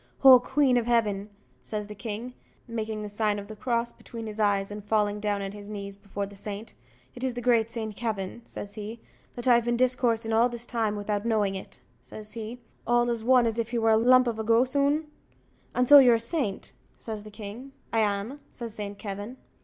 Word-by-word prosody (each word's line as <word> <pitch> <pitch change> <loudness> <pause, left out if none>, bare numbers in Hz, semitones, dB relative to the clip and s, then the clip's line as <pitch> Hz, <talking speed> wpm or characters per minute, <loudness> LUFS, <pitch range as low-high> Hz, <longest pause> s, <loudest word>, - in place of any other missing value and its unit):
"Oh, 260 -2 +10
queen 265 0 +2
of 235 -1 0
heaven!" 210 -4 +1 0.3
says 210 -1 -4
the 210 - -8
king, 220 +4 -6 0.3
making 220 -2 -4
the - - -4
sign 210 0 0
of 200 0 -7
the 215 - -8
cross 235 +1 -1
between 230 -1 -9
his 215 0 -6
eyes, 200 -1 +2
and 205 0 -7
falling 210 0 +1
down 205 -1 -1
on 195 - -4
his 205 0 -10
knees 200 -1 -6
before 200 0 -5
the 200 0 -12
saint; 210 +2 -7 0.4
"is 245 - -7
it 255 -2 -1
the - - -3
great 230 -2 +3
Saint 220 -3 -4
Kavin," 215 -2 -3
says 205 -3 -8
he, 215 +2 -7 0.4
"that 240 +1 -4
I've 240 -1 +6
been 240 0 0
discoursing 245 -3 +1
all 230 +2 +4
this 240 -1 -7
time 225 -3 -1
without 205 0 -2
knowing 215 -4 +1
it," 190 - -8 0.2
says 215 0 -9
he, 230 +2 -6 0.3
"all 240 0 +3
as 230 -2 -3
one 250 0 +5
as 230 0 -1
if 230 0 -1
he 240 - -2
was 225 -1 +4
a - - +5
lump 255 +3 +6
of 230 -2 -2
a - - -1
gossoon? 280 +7 +2 0.7
and 250 0 +2
so 290 +1 +11
you're 250 -3 +7
a - - 0
saint?" 230 - -2 0.2
says 220 -2 -6
the 215 - -11
king. 215 +5 -9 0.2
"I 225 - +3
am," 210 +6 -1
says 235 -3 -7
Saint 205 -1 -6
Kavin. 205 +5 -6
225 Hz, 215 wpm, -27 LUFS, 205-240 Hz, 0.7 s, so